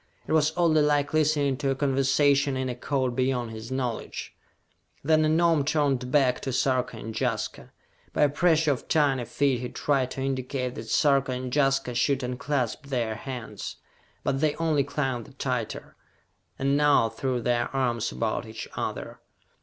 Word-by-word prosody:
It - - -6
was 155 -1 +4
oddly 165 -3 +4
like 145 -1 +1
listening 150 -3 +2
to 140 -1 -1
a 135 - +1
conversation 135 0 +2
in 130 0 -2
a 125 - -3
code 130 0 -1
beyond 125 -2 0
his 110 +2 -8
knowledge. 125 -3 -4 0.7
Then 155 +2 +4
the 155 - +3
Gnome 165 -2 +3
turned 135 -4 0
back 130 -3 +3
to 135 - -4
Sarka 130 -2 0
and 110 +1 -6
Jaska. 115 -1 -3 0.4
By - - +2
a 145 - +5
pressure 160 0 +3
of 130 - -3
tiny 140 -5 +2
feet, 135 0 +1
he 125 - -4
tried 135 -3 0
to 130 - -5
indicate 130 -1 -2
that 110 -1 -8
Sarka 135 0 +3
and 125 0 -4
Jaska 135 -3 +2
should 130 +3 +1
unclasp 125 +1 -2
their 120 -5 -1
hands. 125 0 -6 0.5
But 135 - 0
they 155 -2 +2
only 160 -4 +1
clung 135 -4 -2
the 140 - -16
tighter, 125 -4 -4 0.6
and 140 +1 +1
now 145 -5 +4
threw 125 +3 -2
their 120 0 0
arms 120 -4 -1
about 115 0 -2
each 110 0 -7
other. - - -4
135 Hz, 170 wpm, -26 LUFS, 125-145 Hz, 0.7 s, a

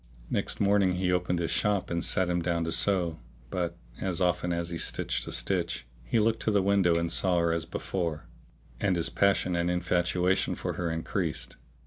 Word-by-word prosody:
Next - - -1
morning 100 -2 +3
he 90 0 0
opened 90 0 +1
his 85 -1 -1
shop 105 -4 0
and 85 0 -1
sat 95 - +2
him 90 0 0
down 85 -1 0
to 80 - -2
sew; 85 -1 +2 0.3
but, 85 -2 -2 0.2
as 90 -3 -2
often 90 -1 +1
as 85 0 -2
he 85 - -3
stitched - - -1
a - - -4
stitch, - - 0 0.2
he - - 0
looked 110 +1 +2
to - - 0
the 100 -2 +3
window 95 -3 +3
and 85 0 -1
saw 90 0 +3
her 85 -1 +2
as 85 -1 -2
before; 85 -5 -3 0.5
and 95 -3 +1
his 85 -1 +1
passion 100 -2 +2
and 85 0 0
infatuation 90 +1 +1
for - - -3
her 85 - -2
increased. 80 +1 -3
90 Hz, 190 wpm, -28 LUFS, 85-95 Hz, 0.5 s, morning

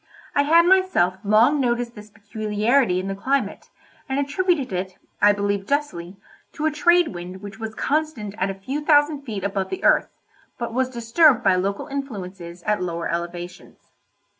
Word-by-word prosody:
I - - +3
had 330 +4 +5
myself 360 - +3
long 225 +8 +4
noticed 240 -2 0
this 210 -1 -12
peculiarity 215 +1 0
in 185 - -4
the 195 - -2
climate, 265 +8 -2 0.4
and 265 - -1
attributed 285 - 0
it, 185 0 -4 0.2
I 205 - +7
believe 200 -1 -1
justly, 200 -12 -2 0.4
to 310 - -3
a 315 - +2
trade 345 +3 +3
wind 180 +2 -8
which 200 -1 -9
was 220 0 -6
constant 285 -9 -2
at 190 - 0
a 195 - -4
few 265 +10 -5
thousand 295 -1 +3
feet 215 -8 -6
above 195 -1 -2
the 380 - -5
earth, - - +4 0.5
but 235 -2 -4
was 255 +1 0
disturbed 250 +2 +3
by 190 - +4
local 195 +2 -2
influences 190 - -7
at 210 -2 0
lower 170 -2 -3
elevations. 175 +1 -6
220 Hz, 165 wpm, -23 LUFS, 195-285 Hz, 0.5 s, I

